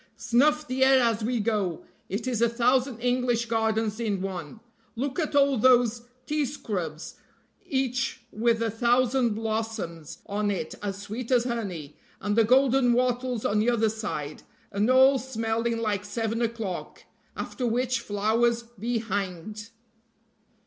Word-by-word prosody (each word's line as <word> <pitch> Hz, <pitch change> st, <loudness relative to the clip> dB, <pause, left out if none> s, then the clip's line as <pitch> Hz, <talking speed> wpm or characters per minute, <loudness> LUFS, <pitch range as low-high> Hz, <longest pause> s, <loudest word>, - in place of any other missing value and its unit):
Snuff 285 Hz, +7 st, +2 dB
the 260 Hz, +1 st, +1 dB
air 265 Hz, 0 st, +6 dB
as 230 Hz, -3 st, +1 dB
we 240 Hz, +1 st, 0 dB
go, 205 Hz, -6 st, -1 dB, 0.2 s
it 205 Hz, +6 st, -3 dB
is 245 Hz, -3 st, -1 dB
a 235 Hz, -, +4 dB
thousand 250 Hz, +1 st, +2 dB
English 245 Hz, -1 st, +1 dB
gardens 220 Hz, -1 st, 0 dB
in 210 Hz, -4 st, -1 dB
one. 185 Hz, -1 st, -5 dB, 0.4 s
Look 270 Hz, +6 st, -2 dB
at 305 Hz, -3 st, -1 dB
all 280 Hz, -3 st, +4 dB
those 240 Hz, -1 st, +4 dB, 0.2 s
tea 300 Hz, +3 st, 0 dB
scrubs 180 Hz, -, -5 dB, 0.5 s
each 265 Hz, -1 st, -1 dB
with 230 Hz, +1 st, +1 dB
a 225 Hz, -, 0 dB
thousand 240 Hz, +1 st, +2 dB
blossoms 220 Hz, -8 st, -4 dB
on 205 Hz, +1 st, -1 dB
it 190 Hz, -5 st, -3 dB
as 200 Hz, -2 st, -3 dB
sweet 215 Hz, +4 st, -6 dB
as 250 Hz, -2 st, +4 dB
honey, 195 Hz, -, -4 dB, 0.2 s
and 205 Hz, +1 st, -1 dB
the 230 Hz, -, +5 dB
golden 255 Hz, +1 st, +4 dB
wattles 250 Hz, -1 st, 0 dB
on 210 Hz, -, +2 dB
the 220 Hz, +3 st, +2 dB
other 225 Hz, -2 st, +2 dB
side, 205 Hz, -9 st, -5 dB, 0.3 s
and 205 Hz, +3 st, +1 dB
all 265 Hz, +1 st, +6 dB
smelling 230 Hz, -2 st, -1 dB
like 210 Hz, -3 st, -1 dB
seven 225 Hz, +2 st, -2 dB
o'clock; 225 Hz, -6 st, -4 dB, 0.3 s
after 250 Hz, -, -3 dB
which 250 Hz, +2 st, 0 dB
flowers 230 Hz, +2 st, +1 dB
be 235 Hz, +1 st, -3 dB
hanged!" 205 Hz, 0 st, -4 dB
230 Hz, 145 wpm, -27 LUFS, 210-250 Hz, 0.5 s, air